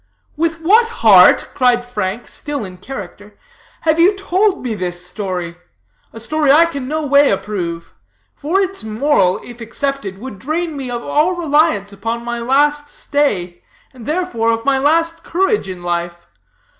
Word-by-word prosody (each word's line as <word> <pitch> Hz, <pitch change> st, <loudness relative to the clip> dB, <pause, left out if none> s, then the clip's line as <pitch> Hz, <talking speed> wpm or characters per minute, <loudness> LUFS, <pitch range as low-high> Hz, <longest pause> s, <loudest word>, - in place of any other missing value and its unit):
"With 330 Hz, +1 st, -1 dB
what 435 Hz, +8 st, +4 dB
heart," 210 Hz, -, +5 dB
cried 245 Hz, -2 st, +2 dB
Frank, 215 Hz, -1 st, -4 dB
still 290 Hz, -6 st, -5 dB
in 185 Hz, -1 st, -10 dB
character, 205 Hz, -1 st, -9 dB, 0.4 s
"have 315 Hz, 0 st, +1 dB
you 375 Hz, +4 st, +5 dB
told 390 Hz, +1 st, 0 dB
me 245 Hz, -3 st, -2 dB
this 180 Hz, -3 st, -4 dB
story? 180 Hz, -2 st, -4 dB, 0.5 s
A 225 Hz, -, -10 dB
story 295 Hz, +5 st, +1 dB
I 320 Hz, +4 st, +6 dB
can 280 Hz, -6 st, -5 dB
no 310 Hz, +2 st, -2 dB
way 285 Hz, 0 st, +5 dB
approve; 190 Hz, -4 st, -3 dB, 0.4 s
for 325 Hz, +7 st, -1 dB
its 390 Hz, -, -2 dB
moral, 220 Hz, -4 st, +1 dB
if 240 Hz, 0 st, -11 dB
accepted, 230 Hz, -3 st, -3 dB
would 215 Hz, -2 st, -9 dB
drain 315 Hz, -, -3 dB
me 270 Hz, -3 st, -5 dB
of 240 Hz, -1 st, -4 dB
all 330 Hz, +5 st, +1 dB
reliance 295 Hz, -, +1 dB
upon 230 Hz, +4 st, -4 dB
my 240 Hz, 0 st, -3 dB
last 290 Hz, +4 st, +1 dB
stay, 200 Hz, -15 st, -1 dB, 0.3 s
and, 245 Hz, -3 st, -12 dB
therefore, 305 Hz, -9 st, -1 dB
of 230 Hz, 0 st, -2 dB
my 275 Hz, -1 st, +2 dB
last 330 Hz, +4 st, +1 dB
courage 385 Hz, -, 0 dB
in 180 Hz, -2 st, -7 dB
life. 175 Hz, 0 st, -3 dB
255 Hz, 155 wpm, -17 LUFS, 200-310 Hz, 0.5 s, I